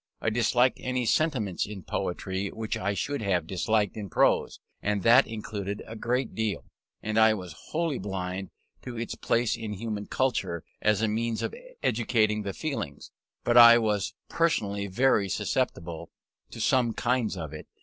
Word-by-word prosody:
I 110 - 0
disliked 120 +2 +2
any 125 -1 -1
sentiments 115 - +1
in 100 -3 -8
poetry 95 +4 -3
which 110 +1 -4
I 100 +2 -1
should 145 +5 -2
have 95 -5 +1
disliked 100 +3 0
in 105 -3 -6
prose; 80 - +2 0.2
and 105 -2 -1
that 120 +5 +6
included 105 -2 -5
a 115 - -8
great 125 +3 -1
deal. 110 -2 -2 0.4
And 110 +1 +1
I 110 0 +6
was 90 -5 -7 0.2
wholly 160 -3 -1
blind 95 -1 -4 0.3
to 125 -2 -7
its 115 0 -3
place 115 -1 +1
in 110 -2 -5
human 105 0 -4
culture, 95 -10 -1 0.2
as 105 0 +2
a - - +3
means 115 +1 -1
of - - -2 0.3
educating 110 -2 +2
the 100 -1 -4
feelings. 135 - -5 0.3
But 120 0 +3
I 120 0 +10
was 105 -4 0
always - - -37
personally 100 -12 0
very 100 -1 +2
susceptible 85 -1 -2 0.4
to - - -10
some 125 -3 +2
kinds 120 -5 0
of 80 -3 -6
it. 75 - -9
110 Hz, 165 wpm, -28 LUFS, 100-120 Hz, 0.4 s, I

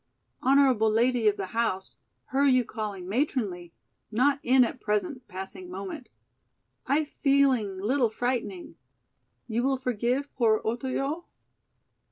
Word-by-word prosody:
Honorable 260 -5 +4
lady 235 +1 +2
of 210 0 +3
the 195 - -3
house, 220 -5 -1 0.3
her 270 +2 +2
you 255 -3 +4
calling 205 -5 -5
'matronly,' 200 - -1 0.4
not 260 +5 +2
in 255 +1 +5
at 245 +1 -3
present 245 +5 -2
passing 185 -1 -8
moment. 200 - -7 0.8
I 285 +4 +3
feeling 275 -9 +2
little 240 +4 +2
frighting. 220 -7 -3 0.7
You 230 0 0
will 265 +1 +1
forgive 250 +3 -1
poor 220 -3 +3
Otoyo?" 270 +8 -2
240 Hz, 120 wpm, -27 LUFS, 210-270 Hz, 0.8 s, in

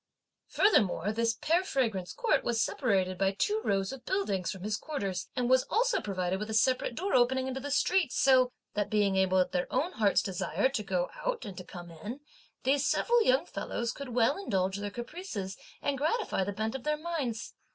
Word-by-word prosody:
Furthermore, 205 - +3
this 230 +1 +1
Pear 330 +9 +1
Fragrance 220 - -1
Court 450 - +1
was 235 -1 0
separated 190 -8 +1
by 195 0 +3
two 430 +1 +1
rows 195 0 0
of 270 -2 -9
buildings 205 - -1
from 190 -2 -6
his 210 +1 -1
quarters 200 - -4
and 250 -1 0
was 260 +1 +4
also 485 +3 +2
provided 185 -2 -2
with 210 +1 -4
a 220 - -1
separate 250 +2 +2
door 385 +8 -2
opening 260 +1 +3
into 265 0 -3
the 285 +2 -5
street, 335 +1 +2
so 255 -2 +4 0.2
that, 205 -1 -1
being 205 -2 +2
able 190 0 +3
at 185 - +2
their 180 0 -1
own 345 +5 0
heart's 210 - +2
desire 190 +7 0
to 265 -5 -2
go 185 -3 -1
out - - -2
and 195 - -7
to - - -7
come 175 -1 -10
in, 210 - -7 0.4
these 275 +2 +2
several 475 0 +3
young 270 - +3
fellows 235 -8 -3
could 280 +1 -7
well 245 +6 +2
indulge 190 - 0
their 205 0 -3
caprices, 235 - -6 0.3
and 280 -2 0
gratify 320 - 0
the 200 - -2
bent 220 +2 -2
of 265 - -4
their 300 +2 0
minds. 300 -8 -3
235 Hz, 200 wpm, -30 LUFS, 195-285 Hz, 0.4 s, was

